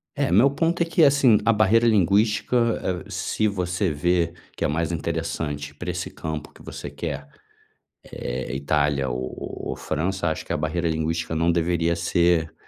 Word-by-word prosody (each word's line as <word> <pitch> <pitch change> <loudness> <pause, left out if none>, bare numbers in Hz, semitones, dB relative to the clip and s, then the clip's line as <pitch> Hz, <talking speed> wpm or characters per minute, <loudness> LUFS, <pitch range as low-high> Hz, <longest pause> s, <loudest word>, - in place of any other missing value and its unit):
É, - - 0
meu 115 +10 +6
ponto 165 +4 0
é - - +1
que, 165 -1 +4
assim, 140 -6 +5
a 115 - +5
barreira 110 +2 +4
linguística, 105 +3 +3 0.5
eh, - - -13
se 110 - -1
você 90 -2 -1
vê 85 +3 +1 0.2
que - - -2
é - - +2
mais 80 +2 -1
interessante 80 -3 -3
pra 90 +5 -5
esse 90 0 -4
campo 80 -1 -6
que - - -19
você 70 - -7
quer, 70 -1 -5 0.8
eh, 65 +2 -4
Itália 70 -1 +1
ou 65 +1 -5
ou - - -3
França, 85 +4 -2
acho 80 - -4
que - - -7
a - - 0
barreira 80 +3 -1
linguística 80 +1 -2
não 85 +2 +2
deveria 85 0 +1
ser 85 -1 +1
85 Hz, 170 wpm, -24 LUFS, 75-100 Hz, 0.8 s, meu